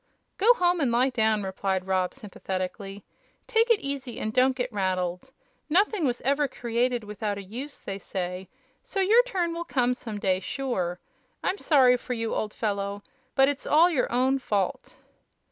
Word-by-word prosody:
"Go 465 Hz, +5 st, +6 dB
home 355 Hz, -2 st, +2 dB
and 270 Hz, -6 st, +1 dB
lie 250 Hz, +3 st, +3 dB
down," 220 Hz, -3 st, +2 dB
replied 190 Hz, -1 st, -2 dB
Rob, 185 Hz, -1 st, 0 dB
sympathetically. 195 Hz, -3 st, -5 dB, 0.4 s
"Take 455 Hz, 0 st, +2 dB
it 460 Hz, -3 st, +4 dB
easy 275 Hz, -3 st, -4 dB
and 215 Hz, -, -3 dB
don't 255 Hz, +1 st, +4 dB
get 250 Hz, -2 st, -3 dB
rattled. 185 Hz, +1 st, -1 dB, 0.4 s
Nothing 385 Hz, +1 st, +2 dB
was 245 Hz, -1 st, -2 dB
every 280 Hz, +2 st, +1 dB
created 240 Hz, 0 st, -1 dB
without 210 Hz, 0 st, -3 dB
a 200 Hz, -, -6 dB
use, 250 Hz, +9 st, -8 dB
they 195 Hz, 0 st, -6 dB
say; 185 Hz, -1 st, -5 dB, 0.3 s
so 390 Hz, -, -5 dB
your 425 Hz, +5 st, +6 dB
turn 370 Hz, -9 st, -2 dB
will 340 Hz, 0 st, -3 dB
come 250 Hz, -6 st, +1 dB
some 225 Hz, -4 st, -7 dB
day, 185 Hz, -2 st, +1 dB
sure! 185 Hz, -7 st, -3 dB, 0.4 s
I'm 390 Hz, -, -1 dB
sorry 255 Hz, -5 st, +5 dB
for 250 Hz, -, -5 dB
you, 230 Hz, -2 st, -2 dB
old 215 Hz, -, -2 dB
fellow, 200 Hz, -1 st, -2 dB, 0.3 s
but 270 Hz, -1 st, +5 dB
it's 285 Hz, 0 st, -2 dB
all 330 Hz, +4 st, +5 dB
your 275 Hz, -7 st, 0 dB
own 260 Hz, +3 st, +2 dB
fault." 200 Hz, -7 st, -2 dB
245 Hz, 170 wpm, -27 LUFS, 200-280 Hz, 0.4 s, Go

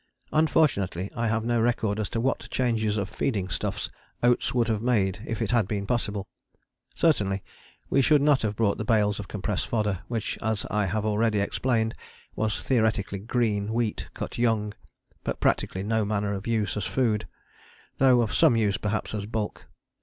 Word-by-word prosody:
Unfortunately 130 Hz, -, +2 dB
I 115 Hz, -1 st, 0 dB
have 115 Hz, 0 st, 0 dB
no 120 Hz, -1 st, +2 dB
record 110 Hz, -3 st, +1 dB
as 105 Hz, -, -2 dB
to 115 Hz, -, -2 dB
what 130 Hz, +3 st, -1 dB
changes 110 Hz, -4 st, 0 dB
of 100 Hz, -2 st, -1 dB
feeding 100 Hz, -4 st, -2 dB
stuffs 75 Hz, -, -2 dB, 0.4 s
Oates 120 Hz, 0 st, +3 dB
would 120 Hz, -2 st, +1 dB
have 110 Hz, -2 st, 0 dB
made 105 Hz, -6 st, +1 dB
if 115 Hz, -, -2 dB
it -, -, -1 dB
had 115 Hz, -5 st, +3 dB
been 100 Hz, -1 st, -2 dB
possible. 105 Hz, -3 st, -1 dB, 0.7 s
Certainly 100 Hz, -, +2 dB, 0.4 s
we 140 Hz, -, +3 dB
should 150 Hz, +3 st, +5 dB
not 145 Hz, -2 st, +4 dB
have 105 Hz, -2 st, -1 dB
brought 110 Hz, -2 st, +1 dB
the -, -, -1 dB
bales 105 Hz, -2 st, +2 dB
of 100 Hz, -, -6 dB
compressed 105 Hz, -1 st, -2 dB
fodder, 105 Hz, -5 st, 0 dB
which 115 Hz, -3 st, -3 dB
as 110 Hz, -2 st, -1 dB
I 105 Hz, -2 st, +1 dB
have 105 Hz, +4 st, -1 dB
already 110 Hz, 0 st, +2 dB
explained, 110 Hz, +2 st, 0 dB, 0.4 s
was 110 Hz, -2 st, -1 dB
theoretically 110 Hz, -5 st, +1 dB
green 110 Hz, -1 st, 0 dB
wheat 115 Hz, -3 st, -1 dB
cut -, -, -5 dB
young, 110 Hz, -3 st, +1 dB, 0.5 s
but -, -, -3 dB
practically 95 Hz, -, +1 dB
no 110 Hz, +1 st, +1 dB
manner 100 Hz, -1 st, -1 dB
of 100 Hz, +2 st, -5 dB
use 110 Hz, -4 st, 0 dB
as 105 Hz, -, -2 dB
a -, -, -5 dB
food, 110 Hz, -5 st, +1 dB, 0.7 s
though 130 Hz, -2 st, +5 dB
of 115 Hz, -, -1 dB
some 120 Hz, -, +5 dB
use 105 Hz, -3 st, +2 dB
perhaps 105 Hz, +1 st, -2 dB
as 105 Hz, -1 st, -3 dB
bulk. 110 Hz, -1 st, -4 dB
110 Hz, 180 wpm, -26 LUFS, 100-120 Hz, 0.7 s, should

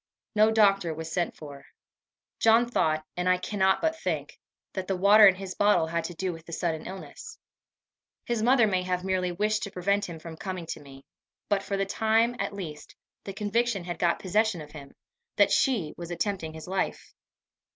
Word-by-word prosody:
No 215 Hz, 0 st, +5 dB
doctor 195 Hz, -6 st, +3 dB
was 160 Hz, +1 st, -6 dB
sent 175 Hz, 0 st, -1 dB
for. 145 Hz, -3 st, -10 dB, 0.8 s
John 225 Hz, +2 st, +5 dB
thought, 155 Hz, -9 st, 0 dB
and 180 Hz, +1 st, 0 dB
I 185 Hz, -, +4 dB
cannot 190 Hz, 0 st, +1 dB
but 320 Hz, 0 st, 0 dB
think, -, -, -3 dB, 0.3 s
that 190 Hz, -1 st, -4 dB
the 195 Hz, -, 0 dB
water 205 Hz, +3 st, +8 dB
in 190 Hz, -, +5 dB
his 190 Hz, 0 st, -6 dB
bottle 205 Hz, -5 st, +3 dB
had 165 Hz, +1 st, -2 dB
to 175 Hz, -, -6 dB
do 185 Hz, +1 st, -2 dB
with 165 Hz, 0 st, -12 dB
the 170 Hz, -, -8 dB
sudden 160 Hz, -2 st, -2 dB
illness. 175 Hz, -7 st, -9 dB, 0.9 s
His 235 Hz, -2 st, -1 dB
mother 245 Hz, 0 st, +5 dB
may 190 Hz, -3 st, +1 dB
have 180 Hz, 0 st, -2 dB
merely 185 Hz, -1 st, 0 dB
wished 215 Hz, +4 st, 0 dB
to 200 Hz, -, -5 dB
prevent 200 Hz, +3 st, 0 dB
him 165 Hz, -, -7 dB
from 160 Hz, 0 st, -10 dB
coming 185 Hz, -2 st, -5 dB
to -, -, -4 dB
me; 135 Hz, -1 st, -14 dB, 0.4 s
but, 200 Hz, -2 st, +2 dB
for 195 Hz, 0 st, -3 dB
the 195 Hz, -, 0 dB
time 225 Hz, +4 st, +2 dB
at -, -, -2 dB
least, 170 Hz, -7 st, -8 dB, 0.3 s
the 195 Hz, -, -5 dB
conviction 210 Hz, 0 st, 0 dB
had 175 Hz, 0 st, -6 dB
got 170 Hz, -1 st, +2 dB
possession 210 Hz, 0 st, +1 dB
of 150 Hz, -1 st, -10 dB
him, 140 Hz, -3 st, -12 dB, 0.4 s
that -, -, +4 dB
she 220 Hz, -, +1 dB
was 170 Hz, -1 st, -7 dB
attempting 175 Hz, -2 st, -3 dB
his 160 Hz, -, -9 dB
life. 190 Hz, +1 st, -3 dB
190 Hz, 195 wpm, -27 LUFS, 170-210 Hz, 0.9 s, water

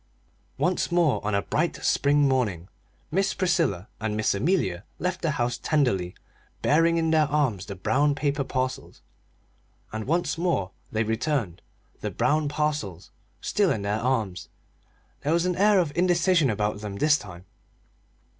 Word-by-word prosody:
Once 180 Hz, 0 st, 0 dB
more 170 Hz, -5 st, +2 dB
on 105 Hz, 0 st, 0 dB
a 100 Hz, -, +1 dB
bright 165 Hz, +3 st, 0 dB
spring 145 Hz, 0 st, +3 dB
morning 105 Hz, -10 st, 0 dB, 0.4 s
Miss 195 Hz, +3 st, +1 dB
Priscilla 170 Hz, -, 0 dB
and 105 Hz, 0 st, -2 dB
Miss 110 Hz, -, +1 dB
Amelia 100 Hz, -, 0 dB
left 180 Hz, +1 st, -2 dB
the 165 Hz, -, 0 dB
house 120 Hz, 0 st, -1 dB
tenderly 100 Hz, -, 0 dB, 0.5 s
bearing 165 Hz, +3 st, +3 dB
in 160 Hz, -1 st, +1 dB
their 155 Hz, -2 st, +4 dB
arms 135 Hz, -11 st, 0 dB
the 100 Hz, -, -6 dB
brown 140 Hz, +10 st, +1 dB
paper 145 Hz, -1 st, 0 dB
parcels 130 Hz, -1 st, -4 dB, 0.9 s
and 110 Hz, +1 st, -4 dB
once 165 Hz, +1 st, 0 dB
more 165 Hz, -, 0 dB, 0.2 s
they 110 Hz, +1 st, +1 dB
returned, 110 Hz, -, -1 dB, 0.4 s
the -, -, -3 dB
brown 150 Hz, +2 st, +1 dB
parcels 145 Hz, -, -2 dB, 0.3 s
still 205 Hz, -3 st, +1 dB
in 105 Hz, -, -2 dB
their 105 Hz, +2 st, -1 dB
arms. 110 Hz, -9 st, -1 dB, 0.7 s
There 150 Hz, +3 st, 0 dB
was 170 Hz, +1 st, +2 dB
an 180 Hz, -1 st, 0 dB
air 205 Hz, +2 st, +4 dB
of 165 Hz, -6 st, +1 dB
indecision 175 Hz, -3 st, +3 dB
about 105 Hz, -1 st, -1 dB
them 105 Hz, -2 st, -5 dB
this 150 Hz, +7 st, +3 dB
time. 85 Hz, -6 st, -11 dB
140 Hz, 150 wpm, -26 LUFS, 105-165 Hz, 0.9 s, their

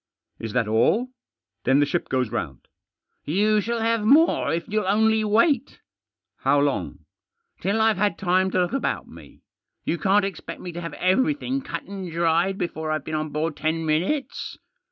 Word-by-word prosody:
" -, -, -52 dB
Is 110 Hz, -, -5 dB
that 120 Hz, -3 st, +1 dB
all? 190 Hz, -, +2 dB, 0.5 s
Then 135 Hz, +3 st, +4 dB
the 145 Hz, -, +4 dB
ship 140 Hz, -, -2 dB
goes 130 Hz, -4 st, 0 dB
round." 70 Hz, -6 st, -5 dB, 0.3 s
" -, -, -52 dB
You 215 Hz, +1 st, +3 dB
shall 235 Hz, +1 st, -2 dB
have 230 Hz, -1 st, +1 dB
more 300 Hz, +9 st, +4 dB
if 165 Hz, 0 st, -2 dB
you'll 215 Hz, -2 st, -1 dB
only 220 Hz, +2 st, +3 dB
wait." 230 Hz, +6 st, +2 dB, 0.6 s
"How 145 Hz, -, +2 dB
long?" 145 Hz, 0 st, -1 dB, 0.2 s
" 465 Hz, 0 st, -49 dB
Till 200 Hz, +3 st, 0 dB
I've 220 Hz, -2 st, +3 dB
had 205 Hz, -3 st, +1 dB
time 185 Hz, 0 st, +2 dB
to 185 Hz, -, +1 dB
look 175 Hz, -, -1 dB
about 275 Hz, -, -1 dB
me. -, -, -15 dB, 0.4 s
You 170 Hz, -, -1 dB
can't 195 Hz, +1 st, +3 dB
expect 195 Hz, -, -6 dB
me 180 Hz, -, -6 dB
to 170 Hz, +1 st, -6 dB
have 170 Hz, -, -6 dB
everything 260 Hz, +7 st, +1 dB
cut -, -, -5 dB
and 190 Hz, -3 st, -7 dB
dried 170 Hz, +3 st, +1 dB
before 160 Hz, -3 st, -3 dB
I've 155 Hz, -2 st, -2 dB
been 155 Hz, -, -5 dB
on 155 Hz, 0 st, -1 dB
board 155 Hz, +1 st, -2 dB
ten 160 Hz, +1 st, -1 dB
minutes. 180 Hz, -, -1 dB
190 Hz, 185 wpm, -24 LUFS, 160-220 Hz, 0.6 s, Then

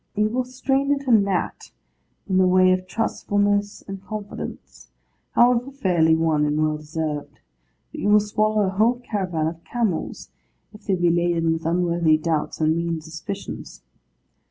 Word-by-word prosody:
You 210 Hz, +1 st, +2 dB
will 250 Hz, +3 st, -1 dB
strain 270 Hz, +2 st, 0 dB
at 275 Hz, -1 st, -8 dB
a -, -, +3 dB
gnat 200 Hz, -5 st, +1 dB, 0.6 s
in 190 Hz, -2 st, +1 dB
the 185 Hz, 0 st, +5 dB
way 185 Hz, 0 st, +5 dB
of 185 Hz, 0 st, 0 dB
trustfulness 205 Hz, -1 st, 0 dB
and 195 Hz, -1 st, -7 dB
confidence, 210 Hz, 0 st, -8 dB, 0.4 s
however 245 Hz, +1 st, +4 dB
fairly 180 Hz, -12 st, +2 dB
won 160 Hz, -2 st, +1 dB
and 150 Hz, 0 st, 0 dB
well 155 Hz, 0 st, +1 dB
deserved; 155 Hz, -1 st, -5 dB, 0.5 s
but -, -, -7 dB
you 205 Hz, -, +1 dB
will 210 Hz, 0 st, +7 dB
swallow 215 Hz, +1 st, +1 dB
a 190 Hz, -, +1 dB
whole 220 Hz, +5 st, +2 dB
caravan 185 Hz, -9 st, -2 dB
of 165 Hz, +1 st, -4 dB
camels, 225 Hz, -9 st, -3 dB, 0.4 s
if 210 Hz, 0 st, -15 dB
they 195 Hz, -, +2 dB
be 175 Hz, -1 st, +2 dB
laden 170 Hz, -1 st, +1 dB
with 165 Hz, 0 st, -4 dB
unworthy 170 Hz, -2 st, +2 dB
doubts 155 Hz, -1 st, -2 dB
and 155 Hz, 0 st, +2 dB
mean 170 Hz, -1 st, -1 dB
suspicions. 165 Hz, +6 st, -8 dB
185 Hz, 155 wpm, -23 LUFS, 165-215 Hz, 0.6 s, will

